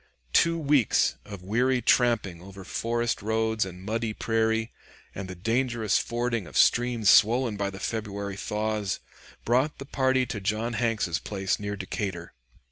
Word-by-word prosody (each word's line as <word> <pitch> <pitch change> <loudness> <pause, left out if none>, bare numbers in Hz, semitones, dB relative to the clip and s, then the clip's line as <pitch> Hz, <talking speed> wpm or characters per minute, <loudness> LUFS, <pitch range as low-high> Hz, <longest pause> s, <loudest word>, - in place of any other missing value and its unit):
Two 165 0 +4
weeks 145 -6 +3
of 100 -3 -9
weary 125 +6 +1
tramping 115 -8 +2
over 95 +1 -11
forest 120 +4 -1
roads 110 0 0
and 90 -1 -9
muddy 110 +1 -2
prairie, 110 0 0 0.4
and 95 -1 -6
the 95 - -7
dangerous 115 +2 +1
fording 120 -4 -2
of - - -5
streams 120 -3 +3
swollen 115 +3 +5
by 100 -1 -1
the 95 0 -9
February 100 -2 -4
thaws, 105 0 -2 0.5
brought 130 +6 +2
the 135 - -8
party 130 -2 +1
to 115 -3 -5
John 110 +4 -1
Hanks's 110 -6 0
place 95 -2 -2
near 100 0 -3
Decatur. 95 -2 -5
110 Hz, 145 wpm, -27 LUFS, 100-120 Hz, 0.5 s, swollen